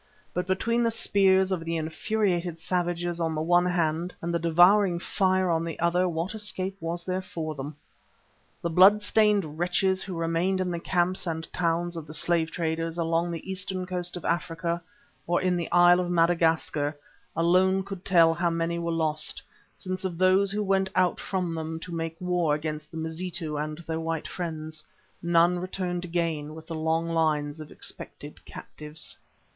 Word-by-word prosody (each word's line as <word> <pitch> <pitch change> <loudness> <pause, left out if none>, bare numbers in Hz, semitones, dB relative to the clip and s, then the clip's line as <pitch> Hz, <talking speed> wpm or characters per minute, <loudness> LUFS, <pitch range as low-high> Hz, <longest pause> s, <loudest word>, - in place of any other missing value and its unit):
But 180 +1 -2
between 230 +6 +1
the 230 - +3
spears 190 -3 +3
of 180 -3 -1
the 165 0 -2
infuriated 175 +2 -1
savages 175 0 -1
on 160 -1 0
the 155 - -1
one 175 +2 +4
hand 170 0 0
and 170 +1 -3
the 170 - +1
devouring 175 +3 +5
fire 185 0 +1
on 165 0 +1
the 165 -2 -4
other 175 +2 +2
what 165 +4 -2
escape 195 -3 -2
was 170 +1 -3
there 185 +1 -2
for 160 -4 -5
them? 145 +1 -6 0.9
The 170 - -1
blood 195 +5 +7
stained 205 -8 +2
wretches 185 +2 +1
who 190 -2 -5
remained 165 +3 0
in 185 -1 -1
the 170 - -2
camps 180 +1 0
and 160 -1 -3
towns 170 0 0
of 160 -2 -6
the 155 - -7
slave 165 0 +1
traders, 165 0 -2
along 165 +1 +1
the 170 +1 -6
eastern 190 -1 -3
coast 180 -1 -3
of 175 - -8
Africa, 170 0 -1 0.5
or 175 +1 +2
in 185 -1 +1
the 170 -2 -3
Isle 175 0 +6
of 180 -1 -1
Madagascar, 165 -3 +2 0.4
alone 185 +3 +3
could 195 -2 -7
tell 165 -3 +5
how 170 +1 +1
many 165 0 -1
were 170 0 -2
lost, 155 -2 -1 0.3
since 185 0 -4
of 180 -3 -3
those 185 +2 +4
who 210 +1 -1
went 190 -1 +1
out 180 -2 +2
from 185 -3 -2
them 160 0 -4
to 175 +1 -8
make 165 0 -4
war 180 -4 +1
upon 155 0 -3
the 160 - -8
Mazitu 160 0 -3
and 150 +1 -3
their 160 0 -2
white 165 -1 -3
friends, 155 -3 -5 0.4
none 170 +1 +3
returned 180 -1 -3
again 165 -3 -2
with 160 - -10
the 165 - -6
long 160 +1 0
lines 155 -2 0
of 155 - -10
expected - - -8
captives. 150 +1 -7
170 Hz, 175 wpm, -27 LUFS, 165-185 Hz, 0.9 s, blood